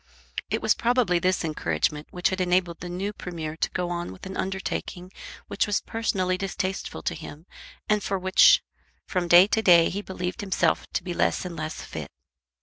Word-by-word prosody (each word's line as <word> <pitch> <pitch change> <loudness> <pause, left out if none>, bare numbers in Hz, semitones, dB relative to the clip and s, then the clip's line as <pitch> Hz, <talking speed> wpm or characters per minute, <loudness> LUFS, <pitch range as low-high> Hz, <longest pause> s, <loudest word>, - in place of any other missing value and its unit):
It - - -1
was - - +4
probably 235 -7 +2
this 185 0 +1
encouragement 150 - -1
which 180 0 0
had 190 0 -2
enabled 180 -1 +1
the 175 - -6
new 190 +4 -3
Premier 165 -5 -6
to - - 0
go 180 -1 -2
on 175 - -3
with 95 - -11
an 190 0 -6
undertaking 190 -1 -4 0.4
which - - 0
was 205 - +1
personally 185 -5 -1
distasteful 190 0 -3
to - - -1
him, 155 -1 -10 0.4
and 210 0 +2
for 195 0 -1
which 190 - +6 0.4
from 180 -2 -1
day 175 +2 +8
to 220 +2 +1
day 170 -5 +6
he 200 - -3
believed 185 +2 -4
himself 195 -2 +1
to - - -1
be 180 -1 -4
less - - 0
and 175 -2 -5
less 155 0 -5
fit. - - -7
180 Hz, 185 wpm, -26 LUFS, 170-190 Hz, 0.4 s, day